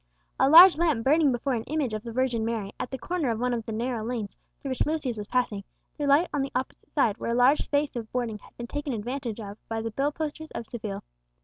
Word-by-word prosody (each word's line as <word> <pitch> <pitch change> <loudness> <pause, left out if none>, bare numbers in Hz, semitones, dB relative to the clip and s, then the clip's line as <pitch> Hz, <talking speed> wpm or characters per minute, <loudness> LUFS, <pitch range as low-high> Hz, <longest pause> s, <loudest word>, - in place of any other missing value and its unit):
A 270 - +5
large 340 +2 +10
lamp 315 -9 +2
burning 295 +2 +4
before 255 +2 -1
an 225 -2 -1
image 290 -6 -1
of 215 - -3
the 230 +1 -7
Virgin 245 -2 0
Mary, 220 -3 -2
at - - -3
the 265 - -5
corner 325 +1 -2
of 225 -1 -1
one 250 0 0
of 230 -2 -3
the - - -3
narrow 230 +1 -2
lanes 225 -3 -4 0.2
through 275 - -6
which 260 - 0
Lucius 300 -6 -1
was 210 -1 -6
passing, 235 -5 0 0.3
threw 290 - -2
light 290 +6 +5
on 290 - +1
the 270 - -3
opposite 255 +1 -4
side, 230 -8 +2
where - - -3
a 235 - +1
large 250 +4 +5
space 290 -1 0
of 225 -2 -5
boarding 235 -4 -2
had - - -20
been 240 - -5
taken 290 +2 -4
advantage 235 +1 -4
of 205 -1 -8
by 225 0 -2
the 225 0 -3
bill 275 +6 0
posters 315 0 -5
of 230 - -4
Seville. 215 -4 -6
250 Hz, 250 wpm, -27 LUFS, 225-285 Hz, 0.3 s, large